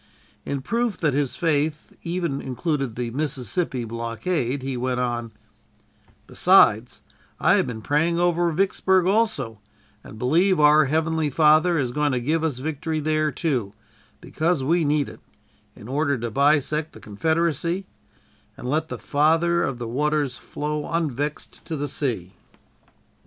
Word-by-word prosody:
In 140 Hz, -1 st, -2 dB
proof 230 Hz, -, -1 dB
that 150 Hz, -5 st, 0 dB
his 140 Hz, -1 st, 0 dB
faith 155 Hz, -3 st, -1 dB
even 170 Hz, -5 st, -2 dB
included 135 Hz, -2 st, -2 dB
the 120 Hz, -1 st, -3 dB
Mississippi 135 Hz, 0 st, -2 dB
blockade 115 Hz, +4 st, -2 dB
he 135 Hz, -1 st, -3 dB
went 125 Hz, 0 st, -1 dB
on: 120 Hz, -2 st, -2 dB, 0.9 s
"Besides, -, -, +3 dB, 0.4 s
I -, -, +4 dB
have -, -, +2 dB
been 110 Hz, -3 st, -6 dB
praying 165 Hz, +4 st, +1 dB
over 175 Hz, -1 st, +2 dB
Vicksburg 190 Hz, +1 st, +2 dB
also, 205 Hz, -, 0 dB, 0.4 s
and 110 Hz, -, -11 dB
believe 170 Hz, -, +2 dB
our 150 Hz, 0 st, +6 dB
Heavenly 160 Hz, +1 st, 0 dB
Father 155 Hz, +4 st, +4 dB
is 130 Hz, -5 st, -1 dB
going 150 Hz, +1 st, 0 dB
to 125 Hz, -, 0 dB
give 155 Hz, +6 st, 0 dB
us 155 Hz, -6 st, -1 dB
victory 155 Hz, +3 st, -3 dB
there, 155 Hz, 0 st, 0 dB
too, 125 Hz, -, -2 dB, 0.5 s
because 160 Hz, -3 st, -1 dB
we 165 Hz, +5 st, +2 dB
need 145 Hz, -1 st, +1 dB
it, -, -, -11 dB, 0.6 s
in 105 Hz, -, -12 dB
order 140 Hz, +1 st, 0 dB
to 120 Hz, -1 st, -4 dB
bisect 150 Hz, +4 st, +1 dB
the -, -, -12 dB
Confederacy, 165 Hz, -, -1 dB, 0.7 s
and 125 Hz, -, -7 dB
let 155 Hz, +4 st, -1 dB
'the -, -, -5 dB
Father 165 Hz, +4 st, +2 dB
of 135 Hz, -7 st, -2 dB
Waters 140 Hz, +3 st, -1 dB
flow 150 Hz, +2 st, -4 dB
unvexed 150 Hz, -3 st, -3 dB
to 165 Hz, -, -4 dB
the 145 Hz, 0 st, -3 dB
sea.'" 120 Hz, -, -3 dB
150 Hz, 140 wpm, -23 LUFS, 130-165 Hz, 0.9 s, our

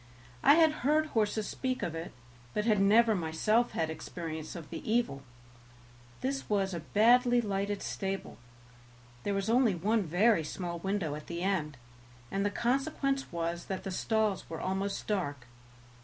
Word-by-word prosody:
I 285 Hz, -, +7 dB
had 320 Hz, -1 st, +6 dB
heard 305 Hz, +4 st, +3 dB
horses 215 Hz, -1 st, +1 dB
speak 255 Hz, -1 st, -2 dB
of 165 Hz, -, -2 dB
it, 165 Hz, +1 st, -5 dB, 0.4 s
but 210 Hz, -, 0 dB
had 215 Hz, -4 st, +3 dB
never 220 Hz, +3 st, +5 dB
myself 205 Hz, +7 st, +1 dB
had 160 Hz, -1 st, -1 dB
experience 160 Hz, 0 st, -6 dB
of 165 Hz, -4 st, -9 dB
the -, -, -5 dB
evil; 225 Hz, -, +1 dB, 1.0 s
this 270 Hz, +1 st, -2 dB
was 195 Hz, -2 st, +1 dB
a 170 Hz, -, -3 dB
badly 240 Hz, +8 st, +4 dB
lighted 200 Hz, -2 st, -2 dB
stable; 195 Hz, -, -4 dB, 0.8 s
there 200 Hz, +7 st, -1 dB
was 195 Hz, +1 st, -1 dB
only 230 Hz, -3 st, +3 dB
one 210 Hz, +6 st, +1 dB
very 180 Hz, +2 st, +3 dB
small 170 Hz, +2 st, -4 dB
window 190 Hz, -4 st, -1 dB
at 150 Hz, 0 st, -8 dB
the 170 Hz, +1 st, -4 dB
end, 165 Hz, -8 st, -1 dB, 0.5 s
and 195 Hz, -, 0 dB
the 205 Hz, -, +2 dB
consequence 270 Hz, +4 st, 0 dB
was 170 Hz, 0 st, -3 dB
that 190 Hz, -1 st, -4 dB
the 195 Hz, -, -4 dB
stalls 215 Hz, +1 st, 0 dB
were 160 Hz, -, -5 dB
almost 195 Hz, +2 st, -2 dB
dark. 145 Hz, -11 st, -2 dB
200 Hz, 155 wpm, -31 LUFS, 170-230 Hz, 1.0 s, I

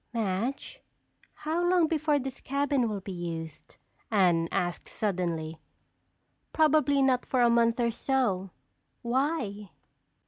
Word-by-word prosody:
"Madge, 230 Hz, -, -2 dB, 0.6 s
how 325 Hz, +3 st, 0 dB
long 350 Hz, -1 st, +4 dB
before 310 Hz, -2 st, +1 dB
this 270 Hz, -1 st, -5 dB
cabin 280 Hz, -3 st, 0 dB
will 205 Hz, -2 st, -4 dB
be 195 Hz, -, -7 dB
used?" 165 Hz, -3 st, -7 dB, 0.3 s
Anne 175 Hz, -6 st, +3 dB
asked 175 Hz, -1 st, -2 dB
suddenly. 170 Hz, -6 st, -2 dB, 0.9 s
"Probably 300 Hz, -3 st, +3 dB
not 255 Hz, -2 st, +2 dB
for 255 Hz, -, 0 dB
a 235 Hz, -, +5 dB
month 230 Hz, 0 st, +3 dB
or 235 Hz, -1 st, +2 dB
so. 230 Hz, -7 st, 0 dB, 0.5 s
Why?" 235 Hz, -, -1 dB
235 Hz, 115 wpm, -28 LUFS, 185-280 Hz, 0.9 s, a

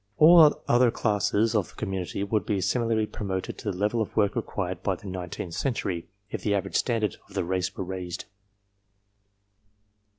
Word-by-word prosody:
All 160 Hz, -1 st, +8 dB
other 120 Hz, 0 st, +5 dB
classes 105 Hz, 0 st, +1 dB
of 105 Hz, -5 st, +1 dB
the -, -, -18 dB
community 95 Hz, -2 st, -3 dB
would 100 Hz, 0 st, 0 dB
be 100 Hz, +2 st, -1 dB
similarly 115 Hz, +1 st, +1 dB
promoted 95 Hz, -3 st, -4 dB
to 105 Hz, -, -2 dB
the 90 Hz, -, -7 dB
level 105 Hz, +4 st, +1 dB
of 110 Hz, -, -1 dB
the -, -, -27 dB
work 105 Hz, -2 st, +2 dB
required 90 Hz, -3 st, -3 dB
by 95 Hz, -, 0 dB
the 90 Hz, -, -15 dB
nineteenth 90 Hz, -2 st, -5 dB
century, 95 Hz, -10 st, -2 dB, 0.2 s
if -, -, -4 dB
the 100 Hz, -, +1 dB
average 100 Hz, -, -3 dB
standard 115 Hz, -4 st, +1 dB
of -, -, -16 dB
the -, -, +1 dB
race 95 Hz, +1 st, -2 dB
were -, -, -2 dB
raised. 90 Hz, -1 st, -5 dB
100 Hz, 175 wpm, -27 LUFS, 95-110 Hz, 0.2 s, All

